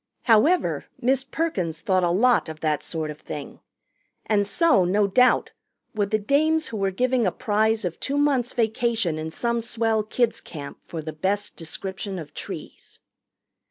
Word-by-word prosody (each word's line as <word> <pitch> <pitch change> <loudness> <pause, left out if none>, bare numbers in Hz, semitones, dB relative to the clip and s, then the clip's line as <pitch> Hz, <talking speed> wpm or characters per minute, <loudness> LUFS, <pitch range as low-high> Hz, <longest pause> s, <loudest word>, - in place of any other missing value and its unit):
However, 265 +11 +3
Miss 260 +2 +2
Perkins 205 - -2
thought 185 +2 +1
a 175 - +3
lot 225 +2 +3
of 155 0 -8
that 155 -2 0
sort 155 -2 -4
of 150 - -11
thing, - - -8 0.7
and 205 -2 +2
so, 320 - +4
no 200 +4 +2
doubt, 250 +6 +3 0.4
would 205 -2 0
the 215 - +2
dames 310 +9 +1
who 225 - -5
were 195 -1 +1
giving 245 +3 +1
a - - +1
prize 220 -1 +1
of 175 -2 -4
two 280 +1 -1
months' 275 -4 +2
vacation 225 -7 0
in 160 0 -4
some 235 +7 -1
swell 225 -1 0
kids' 230 +2 0
camp 145 -4 -9
for 160 -2 -5
the 155 0 -5
best 195 +6 -1
description 190 +3 -5
of 150 -4 -8
trees. - - -8
210 Hz, 165 wpm, -24 LUFS, 175-245 Hz, 0.7 s, so